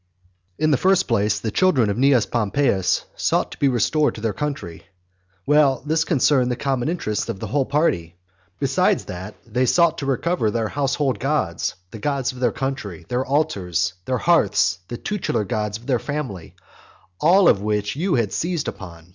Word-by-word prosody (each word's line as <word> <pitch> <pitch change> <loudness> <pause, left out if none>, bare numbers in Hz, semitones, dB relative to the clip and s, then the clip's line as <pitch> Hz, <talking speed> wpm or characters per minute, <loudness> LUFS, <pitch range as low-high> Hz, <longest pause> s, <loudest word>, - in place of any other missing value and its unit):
In 155 0 +2
the 140 - +4
first 190 0 +3
place, 105 -3 +1
the 110 +1 -3
children 130 - +3
of - - -2
Cnaeus 130 -1 +3
Pompeius 110 -3 0
sought - - 0
to - - -10
be 140 - +3
restored 135 +5 +1
to 110 - -8
their 110 -2 -1
country. 140 - -5 0.6
Well, 145 -3 +3
this 160 +2 +1
concerned 135 -5 +2
the 125 - 0
common 135 +1 -1
interests 120 -12 -2
of 105 -4 -4
the - - -5
whole 140 -2 0
party. 95 - 0 0.4
Besides - - +1
that, 95 +4 -7
they 125 +3 0
sought 170 +2 +3
to 140 - -4
recover 140 -2 0
their 110 0 -1
household 140 -1 -1
gods, 135 - -1 0.2
the 110 - -8
gods 140 +1 -1
of 125 - -12
their 125 - +2
country, 135 -11 -5
their 125 +1 0
altars, 100 - 0
their 130 - 0
hearths, 105 - +2
the 120 - -5
tutelar 170 - -2
gods 105 +1 -2
of 115 - -17
their 125 -3 +1
family; 130 - -5 0.6
all 180 +3 +5
of 100 - +4
which 105 0 -1
you 175 +3 0
had 115 -5 0
seized 170 -2 -2
upon. 85 -2 -8
125 Hz, 180 wpm, -22 LUFS, 105-150 Hz, 0.6 s, all